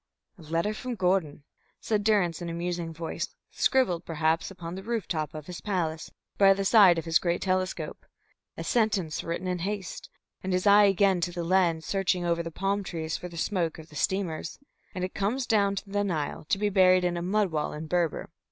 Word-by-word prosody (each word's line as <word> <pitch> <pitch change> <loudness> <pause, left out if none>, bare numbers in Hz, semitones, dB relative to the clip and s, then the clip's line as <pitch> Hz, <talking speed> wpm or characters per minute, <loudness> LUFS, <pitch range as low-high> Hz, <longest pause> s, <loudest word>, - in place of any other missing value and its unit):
"A - - -12
letter 165 +6 -1
from 250 +2 -5
Gordon," 180 -7 0 0.4
said 210 -2 -1
Durrance, 195 -6 +2
in 170 - -4
a - - -4
musing 170 -1 -3
voice, 165 0 -5 0.2
"scribbled 205 -11 +2
perhaps 160 0 0
upon 175 -3 -8
the 190 - -6
roof 225 -1 -3
top 155 -2 -3
of 155 -1 -7
his 180 0 -8
palace, 170 -6 -2 0.3
by 195 -1 +7
the 195 0 -2
side 195 -5 +7
of 165 - -3
his 165 0 +3
great 175 -1 0
telescope 185 0 -2 0.5
a - - -4
sentence 205 -9 0
written 170 +2 -4
in 180 -1 -1
haste, 195 +1 -4 0.3
and 190 0 -2
his 180 +2 0
eye 205 0 +7
again 195 -2 +3
to 175 - 0
the 175 0 -4
lens, 170 -2 +2
searching 185 -2 0
over 170 0 +1
the 165 - -5
palm 195 +4 -1
trees 160 -3 -4
for 180 - -5
the 170 - -10
smoke 170 -2 -1
of 160 0 -12
the 150 - -15
steamers 175 -2 -2 0.4
and 180 - -3
it 185 - -3
comes 235 +7 -1
down 200 -4 +2
the 205 0 -1
Nile 155 -7 -3
to - - +2
be 210 +1 +1
buried 185 -2 +5
in 175 -1 0
a 170 - -3
mud 195 +1 +1
wall 150 -1 -1
in 150 +1 -6
Berber. 170 -1 -1
180 Hz, 205 wpm, -28 LUFS, 165-200 Hz, 0.5 s, by